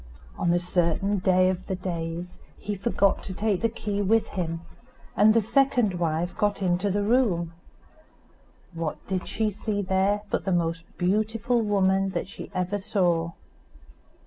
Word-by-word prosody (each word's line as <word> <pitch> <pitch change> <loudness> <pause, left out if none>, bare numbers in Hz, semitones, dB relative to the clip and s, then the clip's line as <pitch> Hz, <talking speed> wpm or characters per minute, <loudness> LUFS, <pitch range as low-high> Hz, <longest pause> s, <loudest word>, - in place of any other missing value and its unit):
On 170 - +1
a 175 - +4
certain 180 +3 0
day 185 0 +4
of 185 0 -3
the 190 - -1
days 175 -1 -5 0.2
he 205 0 -4
forgot 200 -1 +1
to 190 - -7
take 205 -2 0
the 230 - +2
key 205 -2 -3
with 220 +3 +2
him, 165 -3 -3 0.5
and 210 +3 +6
the 230 - +4
second 240 -5 +2
wife 165 +1 -1
got 205 -1 0
into 180 +2 +1
the 205 +1 0
room. 200 -8 +2 1.2
What 165 -2 -3
did 185 -1 -3
she 220 -1 0
see 205 0 -2
there 190 +2 +1
but - - 0
the 190 - -1
most 165 -1 0
beautiful 215 +5 +1
woman 195 -2 +2
that - - -3
she 195 - -9
ever 185 +3 -1
saw. 175 -4 +1
190 Hz, 155 wpm, -26 LUFS, 175-205 Hz, 1.2 s, and